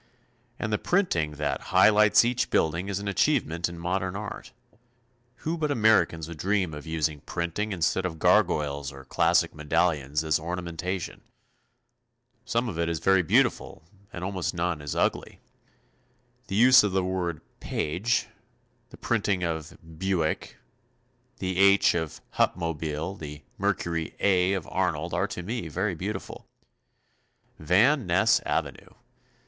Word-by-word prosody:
And 110 -1 -3
the 105 - +1
printing 85 - 0
that 75 0 -2
high 95 +2 +6
lights 105 +1 +5
each 120 +1 0
building 85 +5 0
is 100 - -2
an 100 0 -5
achievement 90 - +1
in 85 - -9
modern 90 +2 -2
art. 105 +4 -7 0.9
Who 165 +2 -1
but 150 -1 0
Americans 105 - +2
would 85 -2 -9
dream 95 -3 0
of 75 +2 -8
using 80 -2 -1
printing 85 +7 -3
instead 95 0 0
of 90 -3 -3
gargoyles 70 -2 +2
or 70 -1 -12
classic - - +2
medallions 75 -2 0
as 80 -1 +1
ornamentation. 85 +2 -4 1.2
Some 120 0 0
of 85 -7 -5
it 85 0 0
is 85 - -1
very 95 +3 +3
beautiful 80 - +1 0.3
and 90 - -7
almost 95 -2 -3
none 85 -3 -1
is 75 -1 -5
ugly. - - -1 1.1
The 95 - -4
use 125 +4 +7
of 105 -3 -1
the 95 -1 +1
word 90 -3 -2 0.2
"Paige," 95 +10 -1 0.6
the - - -13
printing 100 -5 0
of 80 -2 -4 0.2
"Buick," 95 -4 -1 0.8
the 95 -1 -3
"H" 100 0 +5
of 80 -2 -4 0.2
Hupmobile, 80 +2 -1
the 75 -1 -8 0.2
Mercury 85 -1 -1
"A" 95 -1 +3
of 95 -5 -3
Arnold - - -1
are - - +1
to 90 - -6
me 110 -1 -4
very 75 - -1
beautiful. - - -6 1.1
Van 105 - +3
Ness 90 +3 +4
avenue. - - -3
90 Hz, 140 wpm, -26 LUFS, 80-100 Hz, 1.2 s, use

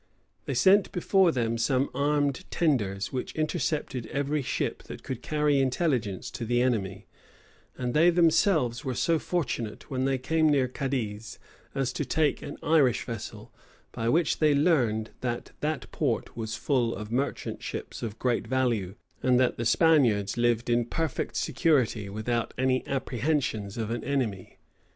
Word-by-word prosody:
They 135 - -3
sent 190 +10 +5
before 185 0 +3
them 115 -4 -1
some 130 +3 +1
armed 145 +4 0
tenders, 105 - 0
which 130 - -4
intercepted 150 -5 -2
every 145 +1 -1
ship 125 - -2
that - - -9
could 130 -2 -5
carry 150 -1 +1
intelligence 130 - 0
to 120 - -5
the 120 +1 +1
enemy; 105 -6 -1 0.7
and 125 -1 -2
they 165 +3 +5
themselves 165 - +3
were 130 -2 -3
so 165 +5 +2
fortunate, 125 -13 -3
when 130 -1 0
they 135 -1 +1
came 160 +4 +2
near 140 -3 +3
Cadiz, 120 -5 -4 0.4
as 130 -2 -1
to - - -2
take 150 0 +1
an - - -7
Irish 145 -7 +3
vessel, 115 -3 -7 0.4
by 115 0 -2
which 165 +4 +2
they 150 -2 +4
learned 120 -9 +2
that 120 -2 -4
that 155 0 -3
port 130 -7 -1
was 110 -1 -4
full 125 -5 0
of 105 +1 -7
merchant 135 +4 -2
ships - - -6
of 110 -2 -5
great 120 -2 0
value, 115 -7 0 0.3
and 125 -1 +3
that 130 -1 +2
the 115 - -3
Spaniards 120 - +3
lived 120 -1 +1
in 120 0 +2
perfect 160 +4 -3
security 130 - +1
without 115 +3 -2
any 130 0 +1
apprehensions 125 -6 -1
of 110 -1 -3
an 120 - -3
enemy. 125 -9 -2
130 Hz, 155 wpm, -27 LUFS, 115-150 Hz, 0.7 s, sent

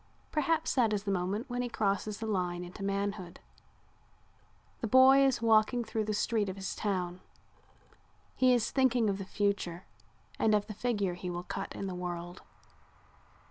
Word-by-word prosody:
Perhaps 320 +2 +1
that 230 -5 +3
is 200 -1 -1
the 200 - -1
moment 195 +6 -1
when 245 -1 -2
he 245 - -2
crosses 205 -1 -1
the 225 - -5
line 180 -4 -1
into 180 +3 -10
manhood. 200 -2 -3 1.4
The 230 - -2
boy 260 +3 +7
is 265 -3 +2
walking 225 +2 +4
through 220 -1 -2
the 215 - -1
street 210 -1 0
of 185 - -5
his 195 -1 -5
town. 185 -4 -2 1.2
He 255 -1 +4
is 240 -3 +2
thinking 250 -5 +3
of 195 - -4
the 195 - -5
future 195 -3 -2 0.5
and 215 -1 +4
of 205 -1 +1
the 215 - -7
figure 205 -5 -1
he 180 +1 -6
will 175 0 -4
cut 195 +2 -5
in - - -4
the 190 - -4
world. 175 0 -5
205 Hz, 170 wpm, -31 LUFS, 185-230 Hz, 1.4 s, boy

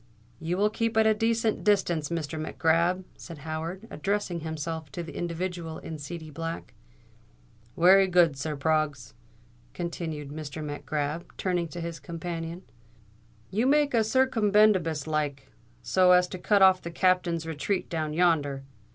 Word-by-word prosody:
"You 165 +3 -2
will 210 +2 +2
keep 230 0 -1
at 220 - +5
a 220 - +5
decent 225 0 0
distance, 175 -7 +2
Mr. 160 -2 -3
Mac 155 - -6
Grab," 170 +3 +2
said 170 -3 -10
Howard, 165 +6 -5
addressing 195 0 -2
himself 160 -1 -5
to 175 - -4
the 165 - -9
individual 170 -1 -4
in 160 -1 -7
seedy 155 +1 -7
black. 165 +3 -6 1.0
"Wery 190 +3 +6
good, 175 -5 +4
sir. 150 +2 -3
Proggs," 145 - -1 0.6
continued 160 -4 -4
Mr. 155 +1 -6
Mac 145 -1 -6
Grab, 150 +2 -2
turning 180 -2 0
to 170 +2 -8
his 165 -1 -5
companion, 165 +3 -6 0.9
"you 225 +6 +1
make 290 0 +3
a 230 -2 +4
circumbendibus 210 - +3
like, 150 -3 -2 0.3
so 185 -1 +4
as 180 0 +5
to 185 - -6
cut 200 +2 +4
off 190 -1 +6
the 170 - -6
Captain's 175 -2 +1
retreat 165 +5 -2
down 155 -3 -2
yonder. 150 -5 +1
170 Hz, 150 wpm, -27 LUFS, 155-185 Hz, 1.0 s, Wery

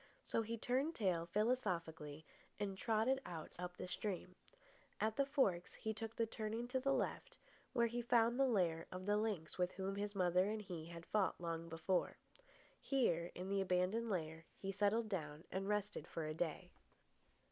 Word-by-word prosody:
So - - +1
he 230 +1 -3
turned 265 +8 +1
tail 180 -6 +1
philosophically 170 - 0 0.3
and 200 -2 -1
trotted 225 +6 +2
on 165 -3 -6
up 180 0 -4
the - - -4
stream. 185 -1 -3 0.6
At 220 0 +1
the 275 +2 +2
forks 200 - +2
he 220 - -2
took 225 +1 -5
the 230 - +2
turning 225 +2 -3
to 260 +1 +1
the 275 +1 +2
left, - - -1 0.4
where 235 - +4
he 235 +1 -1
found 235 +1 +4
the 270 - +6
lair 175 -8 +2
of 185 0 -5
the 205 +1 +3
lynx 205 -7 -1
with 180 0 +2
whom 195 +1 -2
his 205 0 -2
mother 180 +1 +4
and 220 0 -1
he 170 -5 -5
had 170 0 -8
fought 205 -3 +1
long 165 -1 -3
before. 170 +3 0 0.6
Here, 175 - +2
in 180 +1 -4
the 195 0 +2
abandoned 190 +5 +2
lair, 160 -4 -2
he 195 - -3
settled 205 +3 +2
down 155 -6 -3
and 195 +1 -1
rested 210 -5 -1
for 165 - -3
a 155 - -2
day. 175 +2 -2
195 Hz, 180 wpm, -40 LUFS, 175-225 Hz, 0.6 s, the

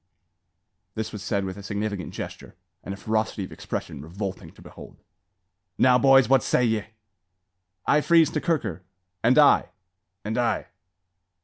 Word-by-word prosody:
This 110 -1 -4
was 105 - -6
said 100 +1 -1
with 95 +1 -6
a - - -8
significant 100 -4 -4
gesture, - - -8 0.3
and - - -6
a 100 - -5
ferocity 110 -1 -2
of - - -13
expression - - -6
revolting 95 +1 -6
to - - -18
behold. - - -13 0.8
"Now, 125 -1 +5
boys! 135 -1 +6
what 135 -1 +4
say 125 - +1
ye?" 110 -2 0 1.0
"I 150 - +3
freeze 165 0 +4
to 150 - -2
Kirker." 120 - -1 0.4
"And 120 +4 +4
I." 150 -1 +5 0.6
"And 110 +3 -2
I." 120 - -1
110 Hz, 145 wpm, -25 LUFS, 100-130 Hz, 1.0 s, boys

